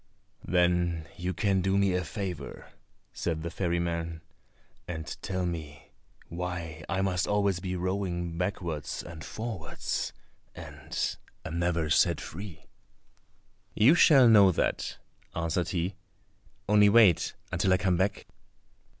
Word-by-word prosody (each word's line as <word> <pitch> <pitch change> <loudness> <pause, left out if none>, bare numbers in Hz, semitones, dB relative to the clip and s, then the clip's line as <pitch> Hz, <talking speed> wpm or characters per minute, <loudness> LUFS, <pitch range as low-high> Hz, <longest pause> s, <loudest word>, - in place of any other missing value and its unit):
"Then 90 -2 +1
you 90 +1 -3
can 95 +1 +1
do 95 +1 +1
me 100 -1 +3
a 90 0 0
favour," 90 +2 -6 0.4
said 80 -2 -2
the 85 - -4
ferryman, 85 -2 -2 0.7
"and 80 -3 -5 0.2
tell 95 -1 -2
me 80 -4 -6 0.4
why 85 -2 -5
I 95 +1 0
must 90 -2 0
always 100 -3 +1
be 90 0 -3
rowing 90 -2 -2
backwards 85 -5 -3
and 85 -1 -9
forwards, 110 -8 -4 0.4
and - - -4 0.3
am 80 +1 -3
never 85 -3 0
set - - +4
free?" 90 0 -8 1.1
"You 115 +8 +6
shall 140 -7 +7
know 100 -4 +7
that," - - -1 0.4
answered 85 +1 -1
he; 90 +1 -1 0.7
"only 105 0 +6
wait 105 -6 +5 0.2
until 95 - +1
I 95 - +5
come 90 -2 +1
back." 95 +3 0
90 Hz, 125 wpm, -29 LUFS, 85-95 Hz, 1.1 s, shall